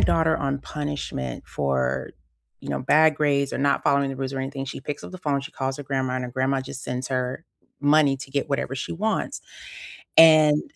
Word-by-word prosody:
daughter 160 -1 +3
on 140 -3 -1
punishment 145 - -5
for, 65 -2 -1 0.5
you - - -10
know, - - -1
bad 155 +4 +4
grades 140 -2 +1
or - - -2
not 140 +1 +1
following 140 0 +3
the 135 - -6
rules 135 0 -3
or 135 - -3
anything, 135 +1 -4
she 135 - -6
picks 145 +2 -6
up - - -9
the 185 - -8
phone, 145 -5 0
she - - -9
calls 135 0 -3
her - - -5
grandma, 130 -2 -1
and 130 0 -2
her 125 - -6
grandma 130 +2 0
just 135 +1 -8
sends 125 0 -4
her 130 +3 -2 0.4
money 145 -1 +4
to 135 0 -10
get 140 0 -1
whatever 140 -2 -1
she 130 - -4
wants. 215 +6 -2 0.8
And 155 -2 +7
140 Hz, 205 wpm, -24 LUFS, 130-150 Hz, 0.8 s, And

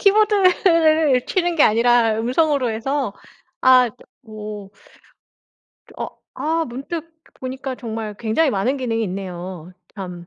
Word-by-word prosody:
키보드를 360 - +4
치는 350 -2 0
게 305 - +5
아니라 230 0 +4
음성으로 260 +1 +1
해서? 255 +1 -2 0.5
아 255 -1 +6 0.4
뭐 210 -2 -8 1.3
어 - - -3 0.3
아 325 +1 0
문득 320 +6 -6 0.3
보니까 260 0 -5
정말 220 -3 -5
굉장히 235 +7 +1
많은 225 +7 0
기능이 230 -4 -1
있네요. 180 -2 -6 0.2
참. 180 -3 -8
250 Hz, 230 characters per minute, -21 LUFS, 215-315 Hz, 1.3 s, 아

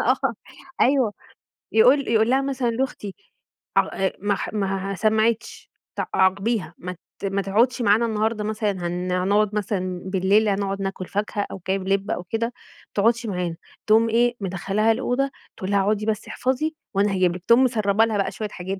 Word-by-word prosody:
آه، 255 -1 +1 0.5
أيوه. 255 -5 +3 0.6
يقول 260 +5 +5
يقول 225 0 +3
لها 270 +1 +3
مثلًا 265 -3 -1
لأختي 230 -5 -3 0.6
ع 190 -1 +1
ما 205 0 +1 0.2
ما 195 -1 -2
سمعتش 220 +3 0 0.3
ت - - -2
عاقبيها، 195 +1 +1
ما 180 +1 -6 0.2
ت - - -9
ما 195 0 0
تقعدش 235 +6 +2
معانا 220 +2 +4
النهارده 220 0 -1
مثلًا 215 0 -1
هن 180 0 -3
هنقعد 200 +3 +2
مثلًا 185 -3 -2
بالليل، 195 +3 +2
هنقعد 195 0 -1
ناكل 195 -1 -4
فاكهة 205 0 -2
أو 195 - -7
جايب 190 0 -1
لب 195 0 0
أو 180 - -2
كده، 225 +5 -1
ما 240 - -7 0.4
تقعدش 230 +3 +2
معانا. 180 -4 -2 0.3
تقوم 225 +1 +5
إيه، 240 +2 +2
مدخلاها 195 +4 +1
الأوضة 270 +4 0 0.3
تقول 190 +1 -4
لها 200 - +3
اقعدي 210 +1 0
بس 215 -1 -2
احفظي 265 +5 -1 0.2
وأنا 200 +1 +2
هاجيب 180 -2 +2
لِك، 180 - -12
تقوم 235 +3 +6
مسربة 215 -3 +2
لها 220 - -1
بقى 195 - 0
شوية 215 -1 -4
حاجات 190 0 -5
210 Hz, 170 wpm, -23 LUFS, 195-230 Hz, 0.6 s, تقوم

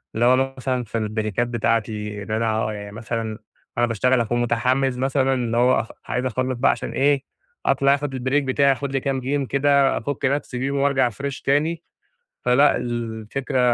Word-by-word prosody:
اللي 115 +2 +2
هو 130 +2 +3
مثلًا 130 -1 -1
في 115 +1 -4
البريكات 110 +1 -1
بتاعتي 110 -3 -1
إن 110 - -8
أنا 110 -1 0
يعني 105 0 -7
مثلًا 110 0 -4 0.4
أنا 120 - +4
باشتغل 120 +2 +2
أكون 120 +2 0
متحمّس 125 +2 +1
مثلًا 135 0 +1
اللي 120 -2 -1
هو 125 +2 +4
أخ 115 - -4 0.2
عايز 125 +1 -2
أخلص 130 +1 -1
بقى 135 - +4
عشان - - -4
إيه 140 0 +2 0.4
أطلع 140 0 +4
أخد 145 -1 -4
البريك 130 +3 0
بتاعي 140 +1 +3
أخد 135 +1 -2
لي 135 - 0
كام 135 0 -1
جيم 135 +2 -1
كده 140 0 +3
افك 145 0 -3
نفسي 135 -1 -1
بيهم, 135 +2 -1
وأرجع 135 -3 +2
فريش 140 +4 -5
تاني، 155 +4 +1 0.6
فلأ 135 +4 +4
الفكرة 120 +2 -3
130 Hz, 175 wpm, -22 LUFS, 115-135 Hz, 0.6 s, أنا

